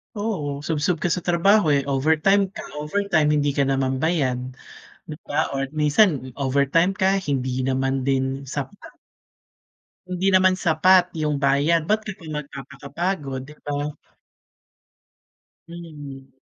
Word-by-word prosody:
Oo, 165 -10 -3
subsob 155 +2 -1
ka 175 - 0
sa 175 +1 -2
trabaho, 175 -1 +3
eh, 140 - +3
overtime 160 +8 +3
ka, - - -7 0.2
overtime 155 -1 +1
hindi 145 -1 +1
ka 140 0 +1
naman 135 -1 0
bayad 140 -4 0 0.7
'di 155 - -7
ba, 150 0 0
or 135 -1 -2
minsan 150 - +2
overtime 140 +8 +1
ka 195 0 +2
hindi 130 -4 -2
naman 135 +1 0
din 135 0 -1
sapat. 140 +8 -7 1.1
Hindi 180 +2 -1
naman 185 0 +4
sapat 180 +2 +3
'yung 150 -2 -1
bayad, 145 +4 +2
ba't 215 +1 +1
ka 215 - -5
pa 165 - -13
magpapakapagod 140 +1 -5
'di 150 - -13
ba? 145 0 -3 1.7
Mm. 145 -6 -10
150 Hz, 130 wpm, -23 LUFS, 135-175 Hz, 1.7 s, naman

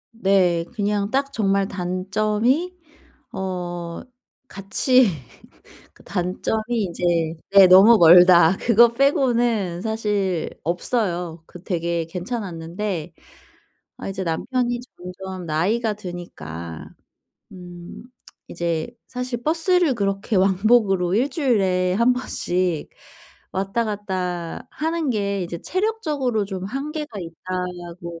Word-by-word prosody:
네. 190 -6 +2
그냥 205 -1 -1
딱 275 +3 0
정말 195 -5 +1
단점이 210 - -1 0.6
어 175 -2 -4 0.5
같이 250 +6 +2 0.9
그 - - -21
단점이 200 +4 -2 0.2
이제 170 -3 0 0.2
예 195 -1 +9
너무 195 +6 +8
멀다. 175 0 +7
그거 235 0 +5
빼고는 235 -8 +1
사실 205 -5 -1
없어요. 175 -2 -2
그 180 - -13
되게 170 -2 -2
괜찮았는데 180 -2 -5 0.9
아 - - -6
이제 195 -1 -4
남편이 240 +8 -1 0.2
점점 185 0 -8
나이가 205 +9 0
드니까 85 - -8 0.6
음 175 -2 -11 0.5
이제 170 0 -2 0.2
사실 250 -1 -4
버스를 330 0 +2
그렇게 200 0 -2
왕복으로 195 -1 +3
1 255 +7 +1
주일에 195 - +1
1 235 +5 +4
번씩 180 - -2 0.6
왔다 195 +5 -1
갔다 185 -5 -4
하는 320 -1 -1
게 200 -3 -1
이제 170 0 -6
체력적으로 305 - -1
좀 190 -2 -5
한계가 280 +2 -5
있다고 175 0 -6
195 Hz, 205 characters per minute, -22 LUFS, 175-235 Hz, 0.9 s, 예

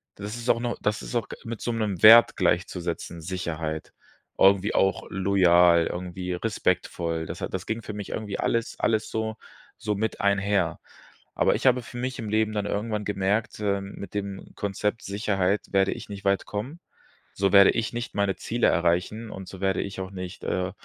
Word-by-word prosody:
das 105 +2 -6
ist 120 - -7
auch - - +4
noch 120 0 -2
das 105 0 0
ist - - -7
auch 115 - 0 0.2
mit 115 -2 -6
so 120 - -1
'nem 105 -5 -2
Wert 115 +1 +9
gleichzusetzen, 85 -1 -1
Sicherheit. 80 -3 -4 0.4
Irgendwie 100 +1 +4
auch 95 0 +2
loyal, 90 -3 +4
irgendwie 90 0 -4
respektvoll. 90 -4 -1
Das - - -7
hat - - -3
das - - -3
ging 110 +1 -3
für 105 - -7
mich 105 -1 -6
irgendwie 105 -3 -4
alles 115 0 -1
alles 110 -1 +1
so 110 0 -3 0.4
so 105 -2 -2
mit 110 +2 -2
einher. 100 0 +1 0.6
Aber - - +3
ich - - -4
habe 125 -1 +4
für 120 - -10
mich 130 +1 -3
im 110 -3 -4
Leben 110 0 +1
dann 105 -1 -1
irgendwann 105 0 -2
gemerkt, 105 +2 -1
äh, 100 -1 0
mit 100 0 -9
dem 100 -1 -5
Konzept 105 +2 -2
Sicherheit 100 -1 0
werde 95 0 +3
ich - - -10
nicht 100 -1 -8
weit 100 0 +2
kommen. 125 +11 -5 0.6
So 100 -1 +1
werde 100 -1 +8
ich 115 - -2
nicht 120 +1 -5
meine 100 -1 +1
Ziele 120 +1 0
erreichen 90 +6 +1
und 95 -1 -8
so 95 0 -10
werde 95 -1 +1
ich 100 -1 -5
auch 95 0 -5
nicht, 90 -1 -7
äh, 90 0 -1
100 Hz, 185 wpm, -26 LUFS, 95-110 Hz, 0.6 s, Wert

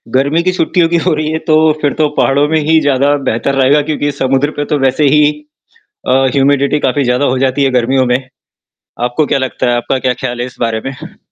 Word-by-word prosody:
गर्मी 140 +5 +2
की 185 - +1
छुट्टियों 175 -1 +1
की 170 - +1
हो 180 - +2
रही 155 0 -2
है 160 - -1
तो 155 0 +4
फिर 145 - 0
तो 150 - +3
पहाड़ों 140 +2 +2
में 160 0 +1
ही 160 +2 +2
ज़्यादा 145 0 +2
बेहतर 135 +5 -1
रहेगा, 135 +2 +3
क्योंकि 145 -1 -2
समुद्र 135 +1 -1
पे 145 - -2
तो 150 - -1
वैसे 135 +3 +1
ही 150 0 +4 0.8
अ, 130 +1 +3
ह्यूमिडिटी 140 +1 +2
काफ़ी 135 +1 0
ज़्यादा 125 +3 0
हो 130 -1 0
जाती 135 +1 0
है 135 - +1
गर्मियों 130 +1 +1
में। 125 +1 +1 0.9
आपको 125 +5 0
क्या - - 0
लगता 130 -1 -2
है? 120 - +1
आपका 125 +2 -2
क्या 125 0 0
ख़याल 120 -2 -4
है - - -2
इस 125 - -11
बारे 115 -1 -1
में? 135 -1 -8
140 Hz, 225 wpm, -13 LUFS, 130-150 Hz, 0.9 s, तो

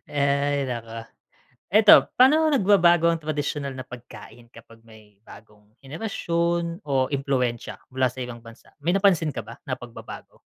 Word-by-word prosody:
Hay 140 0 0
naku. 115 -3 -6 0.7
Eto 210 +1 +7
paano 310 +5 +5
nagbabago 180 - +4
ang 165 -1 +1
tradisyonal 145 -2 -3
na 130 - -8
pagkain 120 -1 -13
kapag 115 0 -17
may 110 -3 -19
bagong 105 -1 -16 0.2
henerasyon 170 +2 -3
o 135 -2 0
impluwensiya 130 -4 -2 0.2
mula 130 -2 +1
sa 130 - -11
ibang 120 -2 -7
bansa? 115 0 -16
May 170 - +1
napansin 190 -6 +2
ka - - -6
ba - - -11
na - - -3
pagbabago? - - -11
140 Hz, 140 wpm, -24 LUFS, 120-170 Hz, 0.7 s, Eto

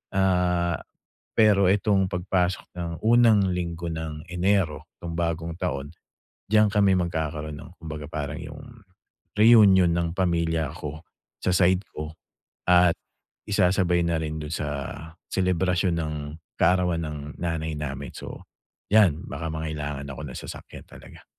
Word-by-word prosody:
Ah, 90 -3 +2 0.6
pero 105 -3 +5
itong 100 -1 +2
pagpasok 90 0 0 0.2
ng 85 -1 -3
unang 110 -4 +5
linggo 85 -1 -3
ng 80 -1 -5
Enero 90 -4 0
'tong 85 -1 -4
bagong 85 0 -1
taon, 70 -5 -3 0.6
diyan 110 0 +5
kami 100 -2 +4
magkakaroon 80 -3 -3
ng 85 - -11
kumbaga 75 -2 -6
parang 75 0 -4
yung, 75 -1 -9 0.8
reunion 105 -5 +7
ng 85 0 -1
pamilya 85 -4 +1
ko, 75 0 -6 0.4
sa 90 - +1
side 95 +1 +3
ko, 75 +1 -6 0.6
at 90 -1 +6 0.5
isasabay 90 -3 +2
na 85 - +1
rin 80 0 -3
do'n 75 +1 -6
sa 75 -2 -2 0.6
selebrasyon 90 -1 +1
ng 80 -2 -2 0.5
kaarawan 90 -2 +3
ng 75 -1 -5 0.2
nanay 80 -2 -2
namin. 70 -1 -5
So, - - -8 0.5
'yan 95 -7 +5
baka 80 +3 -4
mangailangan 75 -3 -4
ako 70 - -9
ng 65 - -7
sasakyan - - -9
talaga. - - -14
85 Hz, 130 wpm, -25 LUFS, 80-95 Hz, 0.8 s, reunion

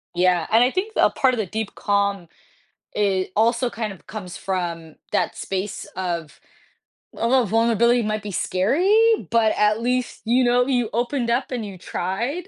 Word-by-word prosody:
Yeah, 180 -2 +2
and 230 +2 +6
I 255 - +2
think 415 +4 -2
a - - +5
part 260 -1 +2
of - - -2
the 215 - -1
deep 220 +3 -5
calm, 200 -3 0 0.7
it 195 -3 0
also 235 +3 +2
kind 220 -4 -4
of 190 - -18
comes 185 -4 -7
from 170 -4 -4 0.2
that - - 0
space 195 +1 -4
of, 170 -4 -4 0.8
although 245 +1 +2
vulnerability 230 +2 +3
might 215 0 -2
be 205 0 -6
scary, 375 - +2
but, 225 -2 +3
at 210 +2 +2
least, 250 +1 -1
you 250 +3 +3
know, 245 +1 +3
you 245 -4 +1
opened 240 +1 -1
up 255 +2 -1
and 235 -4 -3
you 195 -2 -8
tried 235 - -3
220 Hz, 170 wpm, -22 LUFS, 190-245 Hz, 0.8 s, and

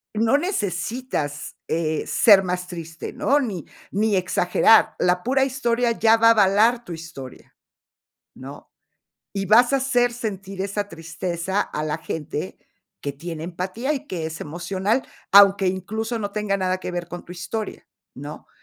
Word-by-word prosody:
no 230 +6 +3
necesitas, 205 - -3
eh, 160 -1 -1
ser 200 -4 +6
más 180 0 -3
triste, 165 -3 -7
¿no?, 285 +2 +2
ni 205 - -4 0.3
ni 210 +1 +1
exagerar. 185 +4 +4
La 180 0 +2
pura 270 +2 +2
historia 245 -2 0
ya 225 0 +4
va 230 0 +5
a - - +8
avalar 220 +3 +4
tu - - -10
historia, 155 -6 -10 0.8
¿no?, - - -11 0.6
y 195 -1 -2
vas 240 +6 +5
a 275 - +5
hacer 245 -2 +1
sentir 195 -5 -5
esa 200 +1 -2
tristeza 170 +3 -3
a 150 - -4
la 155 0 -2
gente 160 +1 -5 0.4
que 140 - -3
tiene 160 +2 -7
empatía 185 - -3
y 270 - -6
que 170 -4 -4
es 160 0 -7
emocional, 185 - -1 0.3
aunque 200 -1 +7
incluso 220 +5 -3
no 205 -1 -4
tenga 210 -2 -1
nada 185 -1 -1
que 185 - -5
ver 175 -1 -4
con 175 0 -8
tu 175 - -10
historia, 205 +5 -5 0.3
¿no? - - -9
195 Hz, 155 wpm, -23 LUFS, 175-225 Hz, 0.8 s, a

